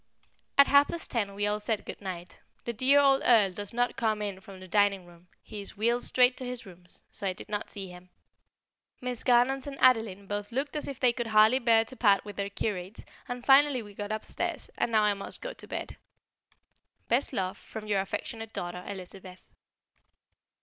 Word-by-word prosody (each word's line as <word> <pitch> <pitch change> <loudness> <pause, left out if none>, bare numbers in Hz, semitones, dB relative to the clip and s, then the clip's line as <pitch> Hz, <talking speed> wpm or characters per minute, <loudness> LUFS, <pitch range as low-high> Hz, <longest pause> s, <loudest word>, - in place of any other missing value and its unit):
At 280 - +9
half 285 +1 +5
past 340 - -4
ten 205 -4 -1
we 205 +1 -1
all 210 0 0
said 210 0 -1
good - - -8
night. 180 -3 -7 0.3
The 235 - -2
dear 260 +5 +4
old 275 -1 +4
Earl 215 -6 +5
does 205 +2 -4
not 245 +1 0
come 220 -2 0
in 200 -2 -4
from 190 0 -12
the 185 - -11
dining 200 -1 +2
room; 175 0 -18 0.2
he 210 - -8
is 200 - -7
wheeled 235 +3 +1
straight 250 0 +4
to - - -5
his 250 -2 -5
rooms, 180 -2 -13
so 200 - -4
I 185 - 0
did - - -12
not 210 -1 -3
see 195 -1 -6
him. 180 0 -13 0.9
Miss 250 -2 -4
Garnons 255 +2 +3
and 275 -1 -6
Adeline 225 -6 +3
both 205 +2 -4
looked 275 +5 -2
as 300 - -3
if 275 - -6
they 250 -2 +4
could 235 -1 -3
hardly 220 +3 +5
bear 230 -2 +4
to 260 - -8
part 205 -5 +3
with 205 -1 -8
their 200 0 -2
curate, 200 -1 -4 0.2
and 245 0 -5
finally 275 -2 +5
we 205 -1 -12
got 205 +1 -5
upstairs, 215 0 -4
and - - -1
now 215 -1 +4
I 210 -1 +3
must 195 0 -5
go - - -6
to - - -11
bed. - - -5 1.1
Best 245 +4 +2
love, 190 -5 -2
from 220 -1 -9
your 205 -2 +1
affectionate 225 +3 -5
daughter, 175 +1 -5
Elizabeth. 185 -1 -9
215 Hz, 205 wpm, -29 LUFS, 195-245 Hz, 1.1 s, At